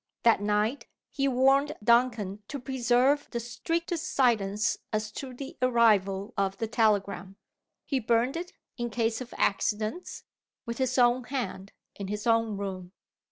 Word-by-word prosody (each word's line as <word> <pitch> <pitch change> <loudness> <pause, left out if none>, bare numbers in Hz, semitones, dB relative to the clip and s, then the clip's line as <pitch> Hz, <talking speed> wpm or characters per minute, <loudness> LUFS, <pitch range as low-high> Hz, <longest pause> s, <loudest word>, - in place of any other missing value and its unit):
That 230 -3 +5
night 210 +5 0 0.2
he 275 -1 0
warned 270 +3 +3
Duncan 225 -4 +2
to 285 - -5
preserve 260 +2 +2
the 235 - -3
strictest 330 +9 -3
silence 215 -5 +2
as 215 0 -2
to 260 +4 -6
the 270 +2 -8
arrival 215 -4 +3
of 195 -1 -1
the 225 - -1
telegram. 200 -4 0 0.5
He 275 - 0
burned 235 +3 +1
it, 350 +2 -5 0.3
in 240 0 -1
case 225 +1 -1
of 250 - -8
accidents, 215 - -1 0.4
with 235 +2 -5
his 260 -1 0
own 245 0 +4
hand, 245 -7 -4 0.2
in 200 - -6
his 210 +1 -4
own 225 -3 +2
room. 190 -2 -5
235 Hz, 145 wpm, -28 LUFS, 210-255 Hz, 0.5 s, That